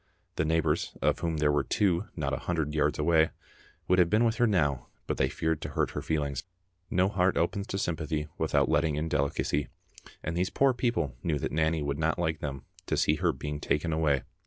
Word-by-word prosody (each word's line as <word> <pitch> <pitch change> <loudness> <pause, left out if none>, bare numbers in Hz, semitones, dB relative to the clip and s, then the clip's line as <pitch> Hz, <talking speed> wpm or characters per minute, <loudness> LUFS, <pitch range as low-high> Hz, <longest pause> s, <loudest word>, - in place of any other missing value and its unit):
The 80 - 0
neighbours, 80 0 0
of - - +1
whom 85 -2 -1
there 75 -1 +3
were 75 -1 +2
two 95 +2 +1
not 70 -3 -2
a - - 0
hundred 80 -4 0
yards 75 -1 +1
away, 80 +1 +3 0.6
would 90 0 +4
have 85 -1 +5
been 110 +5 +3
with 115 0 +1
her 120 -1 +4
now 75 - +1 0.2
but - - -2
they 65 - +2
feared 80 +2 -1
to - - -4
hurt - - 0
her - - -4
feelings. 70 -4 -1 0.5
No 95 +1 +3
heart 95 -2 +1
opens 100 +4 0
to 95 - -3
sympathy 80 -4 -2
without - - +2
letting 80 -3 +2
in 75 +2 -1
delicacy, 70 -1 0 0.6
and 80 - -3
these 90 +1 +1
poor 135 -1 +3
people 120 - -1
knew 80 -3 0
that - - -3
Nanny 80 0 +1
would 70 0 -2
not 80 0 +1
like 80 -3 -1
them 70 -2 -5 0.2
to - - 0
see 75 - +3
her - - +2
being 75 -1 -5
taken 80 +2 0
away. 75 -4 +2
80 Hz, 210 wpm, -29 LUFS, 75-90 Hz, 0.6 s, have